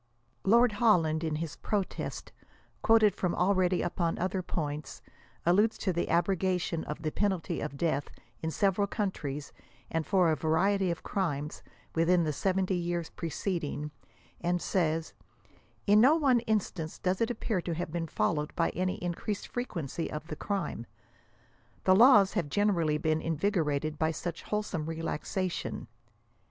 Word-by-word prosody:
Lord 235 +3 +5
Holland, 175 -8 +3
in 160 -2 -1
his 160 -1 -4
protest, 205 -3 -3 0.5
quoted 220 -3 +5
from 180 -3 -1
already 185 -1 +2
upon 170 -1 -1
other 185 +1 -1
points, 150 -4 -4 0.5
alludes 205 +6 +3
to 185 - -1
the 170 - -1
abrogation 180 -1 +1
of 150 +2 -6
the 155 - -1
penalty 190 -3 -1
of 150 -2 -5
death 145 -3 0 0.3
in 160 - -1
save, 195 +3 +1
ral 200 - +3
countries 150 -10 -3 0.4
and 165 0 0
for 180 -2 +3
a - - +2
variety 185 +5 +2
of 170 - -3
crimes, 150 -6 -2 0.3
within 170 +2 +3
the 155 -2 -1
70 190 +4 0
years 175 -1 -2
pre, 165 - -5
ceding, 150 -4 -3 0.5
and 175 +1 0
says 165 -3 0 0.4
'< - - -33
in 210 +1 +6
no 275 +6 +7
one 275 -6 +4
instance 185 -6 -1
does 185 +2 -1
it 230 - +2
appear 220 -5 -1
to 170 -1 -3
have 165 -1 -4
been 165 0 -2
followed 150 -1 -1
by 165 - +1
any 185 +1 -1
increased 180 +4 -3
frequency 170 - -3
of 150 +1 -5
the 155 - -3
crime. 190 - -3 1.0
The 185 - +5
laws 210 -3 +7
have 165 -5 -1
generally 170 -5 +2
been 155 +1 0
invigorated 155 -3 0
by 160 - +2
such 170 +1 -4
wholesome 200 -7 -3
re 165 0 -4
laxation." 180 +3 -3
175 Hz, 155 wpm, -30 LUFS, 160-195 Hz, 1.0 s, no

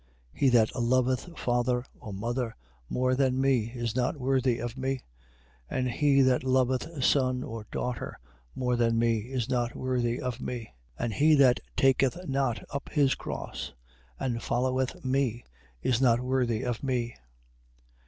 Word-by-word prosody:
10:37. - - -20
He 135 - +5
that 120 -2 +3
loveth 130 +6 +1
father 120 0 0
or 110 - -8
mother 115 +3 -2 0.3
more 130 0 +1
than 130 -1 +2
me, 130 -4 +2
is 120 -2 -2
not 130 +4 0
worthy 130 -2 +1
of 120 0 -4
me; 135 0 -2 0.7
and 130 -1 -1
he 140 +1 +4
that 130 -1 +3
loveth 130 +3 +1
son 130 -2 +2
or 110 -2 -7
daughter 125 -1 -3 0.4
more 125 -1 0
than 115 -1 +2
me, 115 -1 +2
is 125 -3 -1
not 120 -2 -1
worthy 125 -2 -1
of 125 -1 -4
me. 115 - -5 0.3
10:38. - - 0
And 115 - -2
he 155 +8 +5
that 130 -4 +5 0.2
taketh 135 +6 +2
not 135 -3 0
up 140 - -4
his 140 -3 +3
cross, - - -6 0.5
and 120 -3 -2
followeth 130 +2 -1
me, 130 -3 0 0.4
is 125 -1 +2
not 120 -3 +4
worthy 125 -2 0
of 120 -2 -2
me. 125 -3 -1
125 Hz, 155 wpm, -28 LUFS, 120-130 Hz, 0.7 s, He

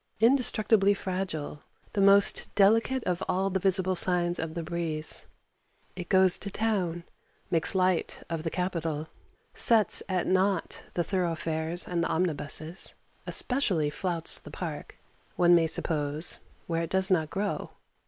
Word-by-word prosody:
Indestructibly 220 -4 +3
fragile, 180 -7 -5 0.3
the 200 - 0
most 200 0 +4
delicate 225 +5 +3
of 180 -1 -2
all 190 +2 0
the 190 - 0
visible 185 0 +2
signs 175 -1 +1
of 160 0 -5
the 170 - -4
breeze, 160 -2 -1 0.7
it 180 -1 -8
goes 190 -2 +5
to 200 - -4
town, 190 -6 -2 0.5
makes 165 +3 +2
light 185 -2 0
of 165 -2 -4
the 165 - -3
capital, 165 -4 -3 0.4
sets 225 -3 +5
at 185 -2 -1
nought 190 -1 0
the 175 - 0
thoroughfares 165 -2 -2
and 170 -1 -1
the - - -1
omnibuses, 160 0 -3 0.3
especially 190 - 0
flouts 170 0 -2
the - - -13
Park, - - -7 0.4
one 175 0 +4
may 165 -1 +4
suppose, 155 -1 +2 0.3
where 165 -1 -2
it 165 - -4
does 190 +1 +2
not 160 -4 +1
grow. 200 +3 -3
180 Hz, 140 wpm, -27 LUFS, 165-195 Hz, 0.7 s, goes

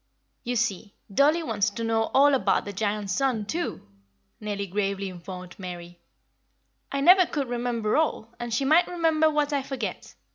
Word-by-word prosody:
"You 245 0 -2
see, 215 -3 -2 0.2
dollie 300 - +3
wants 215 -9 0
to 230 - -6
know 225 0 +1
all 285 +2 +6
about 270 - +2
Giant 205 -1 -2
Sun, 240 0 0
too," 335 - -4 0.5
Nellie 205 -2 -3
gravely 195 0 -2
informed 180 0 -9
Mary. 175 -1 -8 0.9
"I 275 - -1
never 360 +4 +7
could 280 -4 -2
remember 240 -3 -1
all, 240 -7 -1
and 240 -1 -5
she 230 +5 0
might 320 +5 +5
remember 325 -3 +2
what 300 -1 0
I 280 - +1
forget. 270 0 -6
235 Hz, 155 wpm, -26 LUFS, 200-285 Hz, 0.9 s, never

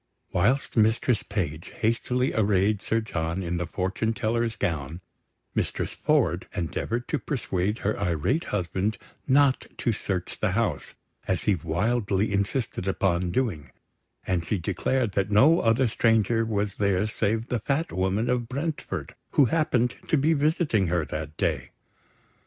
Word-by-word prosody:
Whilst 125 +10 +1
Mistress 110 +1 +3
Page 85 -6 -4
hastily 125 +3 0
arrayed 100 -1 +2
Sir 115 0 0
John 85 -3 -3
in 85 0 -2
the 85 0 -2
fortune 95 +5 -1
teller's 115 0 -1
gown, 80 0 -2 0.5
Mistress - - -1
Ford - - +1
endeavoured 115 +8 -2
to 155 - 0
persuade 105 -6 -1
her 105 - 0
irate 100 - 0
husband 95 +2 -1 0.3
not 140 0 +3
to 120 - +1
search 95 -4 -3
the 105 -4 +1
house, 115 +1 -1 0.3
as - - 0
he 105 - +3
wildly 100 +5 0
insisted 100 0 -1
upon 90 -2 +1
doing; 85 - -1 0.6
and 90 -3 0
she 100 +4 -1
declared 100 +6 0
that 100 0 0
no 135 +11 +6
other 115 +3 +3
stranger 115 0 +2
was 105 -2 -2
there 100 -1 +2
save 110 +1 -1
the 120 - 0
Fat 140 +9 -1
Woman 95 +5 0
of 120 -1 0
Brentford, 145 +4 -4 0.2
who 140 - +6
happened 125 -7 +2
to 155 - +3
be 150 +4 +3
visiting 145 - +2
her 85 -2 0
that 75 0 -6
day. - - -1
105 Hz, 145 wpm, -26 LUFS, 95-120 Hz, 0.6 s, no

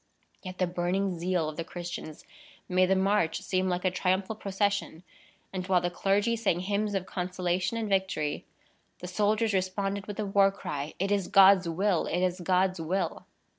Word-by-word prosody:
Yet 185 -1 -8
the 185 - +2
burning 180 +1 -1
zeal 175 -2 0
of 155 - -6
the 165 - -2
Christians 175 -3 -7 0.4
made 185 0 +3
the 190 - +3
march 190 -3 +1
seem 185 0 0
like 180 +1 -2
a 185 - +3
triumphal 190 +3 0
procession; 200 -4 -2 0.5
and 185 -1 -4
while 185 -2 +4
the 175 0 -2
clergy 200 +6 +1
sang 200 -6 0
hymns 205 +2 -1
of 190 -1 -1
consolation 180 +2 -2
and 225 -1 -2
victory, 190 -7 -1 0.5
the 180 - -8
soldiers 210 +3 +1
responded 195 +1 -1
with 205 - -6
the 215 - -2
war 195 0 +4
cry, 150 -6 -5
"It 195 +2 -1
is 200 -3 +1
God's 190 -2 +6
will! 185 +1 +1
It 180 +2 0
is 180 0 0
God's 185 0 +1
will!" 175 +1 -2
185 Hz, 175 wpm, -28 LUFS, 180-200 Hz, 0.5 s, God's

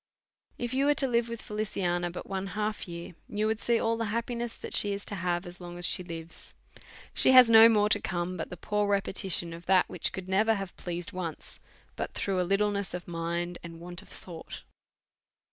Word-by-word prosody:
If 240 +1 -3
you 275 +2 +2
was 290 - +4
to 270 - +1
live 235 -1 +1
with 230 -1 -6
Feliciana 180 -5 -1
but 175 - -7
one 195 0 -3
half 215 -1 -2
year, 170 0 -7 0.2
you 210 +1 -1
would 220 0 0
see 235 0 +2
all 230 0 +1
the 230 - -1
happiness 235 +2 -3
that - - -5
she 205 -1 +4
is 200 0 -5
to - - -6
have 175 -1 -1
as 180 +1 -10
long 175 0 -8
as 175 - -1
she 180 - +5
lives. 165 -1 -8 0.6
She 260 - +4
has 250 -2 +9
no 225 0 +10
more 210 -2 +4
to 205 -1 +3
come, 175 0 -2
but - - -4
the 180 - -8
poor 210 +3 0
repetition 190 -3 0
of 170 +1 -11
that 185 -1 +5
which 180 - -2
could 190 -1 -6
never 215 +4 +3
have 195 -2 -5
pleas 175 0 -5
ed - - -15
once, 175 -4 -6 0.4
but - - -4
through 190 -2 0
a 180 - -2
littleness 200 -1 +1
of 180 - -7
mind, 170 +1 -3
and 165 -1 -9
want 175 +2 -8
of - - -18
thought. 170 -3 -9
190 Hz, 215 wpm, -29 LUFS, 175-215 Hz, 0.6 s, no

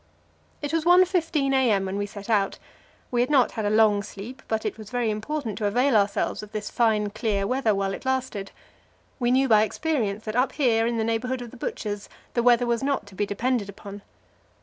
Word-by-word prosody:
It 290 +1 -3
was 330 -1 +1
1.15 345 -5 +3
a.m. 225 -8 +3
when 190 +1 -3
we 205 0 -2
set 205 0 -10
out. 205 -4 +1 0.5
We 240 -1 +2
had 245 - +1
not 275 -4 +4
had 220 -3 -3
a - - +2
long 215 -1 +4
sleep, 215 +6 -9
but 220 -1 -2
it - - -2
was 215 -2 -11
very 245 -3 0
important 225 +2 -4
to 210 - +1
avail 245 +5 +2
ourselves 200 -1 +1
of 210 0 -11
this 215 -1 -4
fine, 215 -3 +2
clear 205 -3 -1
weather 235 -2 +1
while 195 0 -1
it - - -7
lasted; 260 -7 -2 0.7
we 240 -1 +1
knew 265 +2 +3
by 215 -3 +6
experience 220 -3 -1
that 215 0 -4
up 250 +1 +2
here 230 -5 +2
in 235 0 -1
the 225 - +1
neighbourhood 245 +3 -1
of 235 - -10
the - - -12
Butcher's 205 -3 -4 0.2
the 240 - +1
weather 245 0 +4
was 235 0 0
not 275 -5 -1
to 200 - -15
be 205 +2 -1
depended 230 0 -1
upon. 200 0 -9
225 Hz, 215 wpm, -25 LUFS, 205-255 Hz, 0.7 s, by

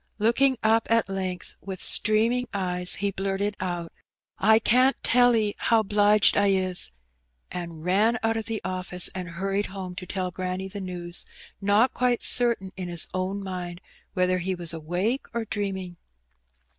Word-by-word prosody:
Looking 245 +5 +2
up 225 +1 +3
at 230 -3 +2
length 185 -2 -4
with 190 -2 -7
streaming 230 +3 +3
eyes, 180 -2 0
he 200 0 -1
blurted 195 +1 -2
out, 175 -2 -4 0.5
''I 220 +2 +5
can't 255 +4 +4
tell 245 0 +5
'e 210 -2 +1
how 225 -1 +3
'bliged 205 0 +4
I 200 0 +3
is," 185 -2 +1 0.6
and 170 -3 -6
ran 210 +6 +3
out 225 0 +1
of 225 -1 -3
the 225 -1 -3
office 185 -1 +1
and 180 -1 -5
hurried 195 +4 -2
home 185 -1 -7
to 180 - -6
tell 185 -1 -3
granny 185 +1 -4
the 200 +1 -7
news, 175 -2 -2 0.3
not 205 +5 +3
quite 245 -1 0
certain 235 -6 +2
in 185 -1 -5
his 170 -2 -2
own 190 +2 -2
mind 180 -2 -5 0.4
whether 185 0 +1
he 185 +2 -2
was 170 -2 -4
awake 180 - -2
or 230 -1 -1
dreaming. 190 -4 -4
195 Hz, 160 wpm, -25 LUFS, 180-220 Hz, 0.6 s, I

